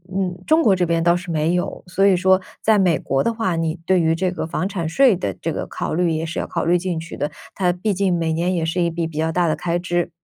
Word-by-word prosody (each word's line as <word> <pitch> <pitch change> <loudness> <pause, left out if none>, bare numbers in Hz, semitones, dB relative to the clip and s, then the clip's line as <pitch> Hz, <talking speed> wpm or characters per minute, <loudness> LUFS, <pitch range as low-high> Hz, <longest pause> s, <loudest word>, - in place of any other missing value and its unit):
嗯， 185 -2 -2
中 320 +1 +4
国 205 - +5
这 180 - +2
边 165 0 0
倒 170 0 +4
是 175 +1 -4
没 160 +1 +1
有。 180 - -3
所 195 +2 +2
以 195 - +5
说 190 +1 +4 0.2
在 220 -1 +4
美 180 -5 +3
国 135 0 -1
的 230 - 0
话， 220 -7 -1
你 165 -1 -1
对 185 -1 +3
于 160 0 +2
这 180 +2 0
个 160 -3 -4
房 180 - -2
产 170 -5 -3
税 255 +8 +4
的 100 - -3
这 - - -1
个 - - -4
考 - - -4
虑 175 +1 +1
也 160 +1 -1
是 165 - -4
要 - - -3
考 - - -2
虑 175 +2 +3
进 175 -1 -3
去 165 +1 -7
的， 145 - -1 0.2
它 180 -2 +1
毕 200 +4 -1
竟 190 -2 +1
每 165 -1 -1
年 175 +3 0
也 170 - -1
是 165 +2 -1
一 170 - +2
笔 165 0 -2
比 160 -2 -7
较 160 +1 +1
大 170 0 +1
的 - - +2
开 170 +3 -1
支。 175 0 -1
175 Hz, 310 characters per minute, -21 LUFS, 165-185 Hz, 0.2 s, 国